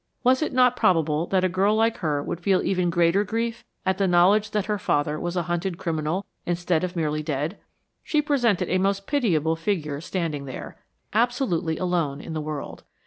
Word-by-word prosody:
Was 255 Hz, +2 st, +4 dB
it 310 Hz, -, 0 dB
not 250 Hz, -1 st, +4 dB
probable 160 Hz, -5 st, +2 dB
that 190 Hz, -1 st, +1 dB
a -, -, +4 dB
girl 195 Hz, +4 st, +2 dB
like 225 Hz, +1 st, +2 dB
her 150 Hz, -5 st, -1 dB
would 170 Hz, -, -4 dB
feel 190 Hz, 0 st, +2 dB
even 180 Hz, -2 st, +1 dB
greater 170 Hz, +3 st, +3 dB
grief 230 Hz, +3 st, -3 dB, 0.2 s
at 190 Hz, 0 st, 0 dB
the 195 Hz, -, +3 dB
knowledge 190 Hz, +4 st, +4 dB
that 210 Hz, -2 st, -1 dB
her 210 Hz, -1 st, -1 dB
father 150 Hz, -2 st, 0 dB
was 175 Hz, +1 st, -3 dB
a 175 Hz, -, +1 dB
hunted 175 Hz, +1 st, -2 dB
criminal 165 Hz, +4 st, -2 dB, 0.2 s
instead 175 Hz, -1 st, 0 dB
of 180 Hz, 0 st, -3 dB
merely 155 Hz, -2 st, -1 dB
dead? 150 Hz, +4 st, -3 dB, 0.4 s
She 305 Hz, -, 0 dB
presented 260 Hz, -9 st, +1 dB
a 185 Hz, -, +1 dB
most 195 Hz, +1 st, 0 dB
pitiable 165 Hz, -, +1 dB
figure 160 Hz, -5 st, -2 dB
standing 165 Hz, -5 st, -3 dB
there, 130 Hz, -, -7 dB, 0.4 s
absolutely 220 Hz, -, +1 dB
alone 170 Hz, -6 st, -1 dB
in 160 Hz, -, -7 dB
the 155 Hz, -, -2 dB
world. 150 Hz, -1 st, -6 dB
180 Hz, 190 wpm, -25 LUFS, 160-205 Hz, 0.4 s, Was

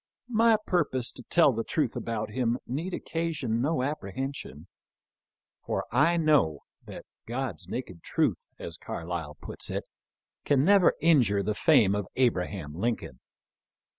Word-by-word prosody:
My 225 Hz, 0 st, +5 dB
purpose 140 Hz, -8 st, 0 dB
to -, -, -9 dB
tell 150 Hz, +1 st, +4 dB
the 115 Hz, 0 st, -2 dB
truth 145 Hz, -3 st, -1 dB
about 110 Hz, -2 st, -3 dB
him 120 Hz, 0 st, 0 dB
need 155 Hz, +9 st, -3 dB
occasion 160 Hz, -10 st, -2 dB
no 145 Hz, -1 st, +1 dB
apprehension; 130 Hz, -, -4 dB, 1.0 s
for -, -, -2 dB
I 155 Hz, +8 st, +4 dB
know 150 Hz, -, +3 dB, 0.3 s
that -, -, -9 dB
" -, -, -65 dB
God's 115 Hz, -, -4 dB
naked 95 Hz, -9 st, -5 dB
truth," -, -, -1 dB
as -, -, -7 dB
Carlyle 80 Hz, -3 st, -5 dB
puts -, -, -5 dB
it, -, -, -2 dB, 0.6 s
can 140 Hz, -1 st, +3 dB
never 195 Hz, -1 st, +5 dB
injure 125 Hz, -12 st, +4 dB
the 105 Hz, -, 0 dB
fame 110 Hz, -5 st, +4 dB
of 100 Hz, -2 st, -2 dB
Abraham 95 Hz, -, 0 dB
Lincoln. 95 Hz, -, -3 dB
125 Hz, 135 wpm, -28 LUFS, 100-155 Hz, 1.0 s, My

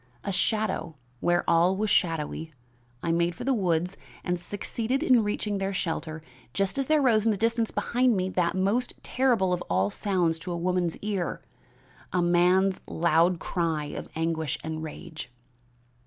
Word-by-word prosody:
A 200 Hz, -, -2 dB
shadow, 185 Hz, -4 st, 0 dB, 0.2 s
where 175 Hz, +4 st, +1 dB
all 175 Hz, +3 st, +4 dB
was 215 Hz, 0 st, 0 dB
shadowy, 160 Hz, -2 st, 0 dB, 0.5 s
I 170 Hz, -, +1 dB
made 170 Hz, +1 st, +1 dB
for -, -, -7 dB
the 270 Hz, +2 st, +2 dB
woods 180 Hz, -4 st, 0 dB, 0.3 s
and 180 Hz, -1 st, -1 dB
succeeded 225 Hz, -, -2 dB
in 250 Hz, -7 st, +5 dB
reaching 205 Hz, -1 st, -2 dB
their 195 Hz, 0 st, -2 dB
shelter 160 Hz, -3 st, -3 dB, 0.3 s
just 195 Hz, +7 st, 0 dB
as 270 Hz, -, 0 dB
there 310 Hz, -2 st, +3 dB
rose 220 Hz, -5 st, +4 dB
in 225 Hz, -, +3 dB
the 210 Hz, -, +1 dB
distance 230 Hz, +1 st, +1 dB
behind 245 Hz, -2 st, +1 dB
me 185 Hz, 0 st, 0 dB
that 180 Hz, -2 st, 0 dB
most 200 Hz, +7 st, 0 dB
terrible 235 Hz, -8 st, +2 dB
of 180 Hz, -, -1 dB
all 95 Hz, +3 st, +2 dB
sounds 175 Hz, -, 0 dB
to 180 Hz, +2 st, -6 dB
a 170 Hz, -, -2 dB
woman's 175 Hz, -1 st, 0 dB
ear, 200 Hz, -5 st, -2 dB, 0.7 s
a 180 Hz, -, +1 dB
man's 180 Hz, +2 st, +3 dB
loud 170 Hz, +2 st, +3 dB
cry 165 Hz, -3 st, -1 dB
of -, -, -6 dB
anguish 160 Hz, -3 st, -1 dB
and 160 Hz, 0 st, -4 dB
rage." 155 Hz, -2 st, -8 dB
180 Hz, 165 wpm, -27 LUFS, 165-210 Hz, 0.7 s, in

